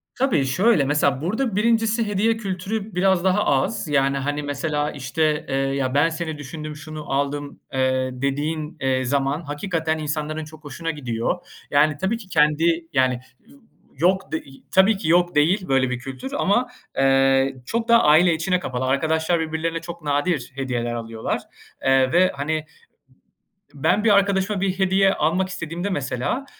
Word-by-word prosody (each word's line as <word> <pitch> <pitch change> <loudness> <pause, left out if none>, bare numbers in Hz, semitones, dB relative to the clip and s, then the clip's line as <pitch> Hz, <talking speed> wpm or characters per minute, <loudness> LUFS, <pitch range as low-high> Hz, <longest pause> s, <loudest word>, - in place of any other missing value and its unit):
Tabii, 205 - +1
şöyle, 180 - +3
mesela 140 -1 +1
burada 220 +6 -1
1'incisi 225 +1 +2
hediye 220 +3 +1
kültürü 200 0 -4
biraz 190 -1 +2
daha 190 +2 +2
az, 145 +8 0
yani, 140 -1 +2
hani, 145 +2 -2
mesela 145 +1 -2
işte, 150 +3 -1
eee, 135 - -1
ya, 135 -1 0
ben 145 +4 +4
seni 160 -2 -4
düşündüm, 150 +2 -7
şunu 155 -1 -8
aldım, 140 +1 -2
eee, 130 0 +1
dediğin, 150 +4 -3
eee, 130 -1 +1
zaman 140 +3 0
hakikaten 160 +1 -2
insanların 155 +1 -3
çok 155 0 -14
hoşuna 165 +3 -4
gidiyor. 125 +1 -2 0.3
Yani, 145 0 +3
tabii 190 +8 -1
ki 220 -4 -12
kendi, 165 +1 +2
yani 130 -2 +3 0.3
y 275 - -18 0.4
yok, 185 +4 +1
de 160 - -2 0.3
tabii 190 +2 +5
ki 165 - -4
yok 175 -1 +3
değil 180 +6 +2
böyle 135 -1 +2
bir 125 0 -3
kültür, 135 - -7
ama, 240 0 +2 0.3
eee, 135 0 +3
çok 230 - -2
daha 235 0 +5
aile 160 +3 +5
içine 180 +3 0
kapalı. 130 -5 -3
Arkadaşlar 160 +5 +1
birbirlerine 160 +1 -2
çok 170 0 -8
nadir 145 -1 -1
hediyeler 125 -3 -2
alıyorlar, 115 -1 -3 0.4
eee, 135 -1 +3
ve 185 +2 +4
hani, 155 +2 -2 1.1
b 140 - -13
ben 205 +4 +2
bir 225 - +4
arkadaşıma 200 0 +2
bir 190 -1 -1
hediye 195 0 +3
almak 180 +5 +1
istediğimde 175 +2 -4
mesela, 145 - -2
155 Hz, 160 wpm, -22 LUFS, 140-185 Hz, 1.1 s, tabii